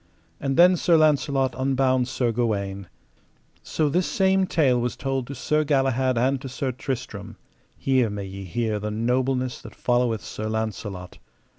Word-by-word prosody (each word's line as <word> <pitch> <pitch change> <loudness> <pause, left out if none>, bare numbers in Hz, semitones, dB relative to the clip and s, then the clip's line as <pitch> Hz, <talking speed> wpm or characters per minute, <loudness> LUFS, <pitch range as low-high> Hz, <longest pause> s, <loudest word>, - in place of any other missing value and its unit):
And 135 -1 -2
then 180 +1 +7
Sir 170 0 +4
Launcelot 140 -3 +2
unbound 130 -1 +1
Sir 125 -2 0
Gawaine. 100 -5 -2 0.7
So 155 - -1
this 175 +5 +1
same 190 -1 +2
tale 130 -9 +2
was 120 0 -2
told 135 -2 -2
to 140 - -6
Sir 150 +5 +1
Galahad 135 -3 +1
and 130 +3 +1
to 135 - -6
Sir 130 +1 -2
Tristram:—here 130 0 -3
may 100 -1 -5
ye 95 0 -8
hear 110 +2 -1
the 105 +1 -3
nobleness 125 +3 -1
that - - -12
followeth 120 -3 0
Sir 110 0 -5
Launcelot. 105 -4 -4
130 Hz, 150 wpm, -24 LUFS, 110-135 Hz, 0.7 s, then